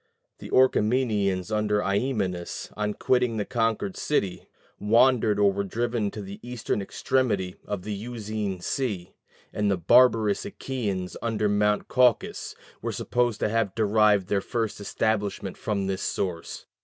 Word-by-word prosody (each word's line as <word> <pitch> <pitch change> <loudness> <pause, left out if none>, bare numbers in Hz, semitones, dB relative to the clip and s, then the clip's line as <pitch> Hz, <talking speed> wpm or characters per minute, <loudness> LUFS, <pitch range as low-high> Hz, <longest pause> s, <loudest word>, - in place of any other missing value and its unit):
The - - -9
Orchomenians 110 -6 +2
under 105 -1 +1
Iamenus, 100 -4 -2
on 105 0 -2
quitting 125 -3 +1
the 105 - -1
conquered 115 - -1
city, 100 -11 -1 0.3
wandered 115 0 +4
or 100 -1 +4
were 100 +1 -1
driven 115 +1 -1
to 105 0 -7
the 100 +1 -8
eastern 120 -4 -3
extremity 100 -4 0
of 100 -3 -3
the 105 - -4
Euxine 105 -3 -4
Sea; 100 -7 -3 0.4
and 105 -1 0
the 100 - +2
barbarous 110 +2 +4
Achæans 100 -7 -4
under 110 -2 0
Mount 105 0 +1
Caucasus 125 -4 +1 0.3
were - - -2
supposed 120 -3 0
to - - +1
have 110 -3 0
derived 105 -2 +3
their 100 -1 +1
first 110 0 -2
establishment 100 -2 -1
from 100 -2 -2
this 95 0 -2
source. 90 -4 -3
105 Hz, 140 wpm, -26 LUFS, 100-115 Hz, 0.4 s, wandered